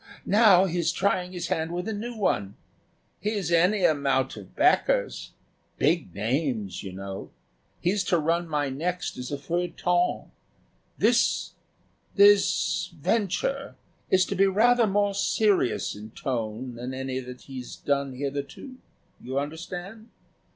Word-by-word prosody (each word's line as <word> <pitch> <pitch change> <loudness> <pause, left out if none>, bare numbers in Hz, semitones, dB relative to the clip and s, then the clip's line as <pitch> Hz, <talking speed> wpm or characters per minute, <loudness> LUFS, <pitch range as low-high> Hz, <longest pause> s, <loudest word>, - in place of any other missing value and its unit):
Now 200 -3 +6
he's 170 -2 0
trying 185 -1 0
his 175 -2 -4
hand 160 +1 -1
with 180 +3 -3
a 220 - -2
new 235 +3 -5
one. 100 - 0 0.6
He's 205 -5 -2
any 180 +4 +4
amount 135 -3 +1
of 100 -4 -12
backers - - +2 0.4
big 150 - +1
names, 110 - -1
you 95 - -7
know. 95 +1 -7 0.5
He's 195 +3 +1
to 180 - +2
run 170 +2 0
my 150 -2 0
next 175 +7 -3
as 125 +1 -6
a 145 - -2
feuilleton. 175 +3 -1 0.7
This - - +2 0.6
this 205 0 +4
venture 230 - -1 0.3
is 185 -1 +4
to - - -3
be 195 +1 +4
rather 230 +4 +4
more 205 0 +1
serious 200 - +1
in 105 +1 -9
tone 120 0 -4
than 125 +2 -6
any 130 0 -3
that 125 -1 -9
he's 130 -2 -8
done 140 -1 -1
hitherto. 140 - -5 0.4
You 130 +2 -5
understand?" 175 +9 -5
170 Hz, 130 wpm, -26 LUFS, 130-195 Hz, 0.7 s, Now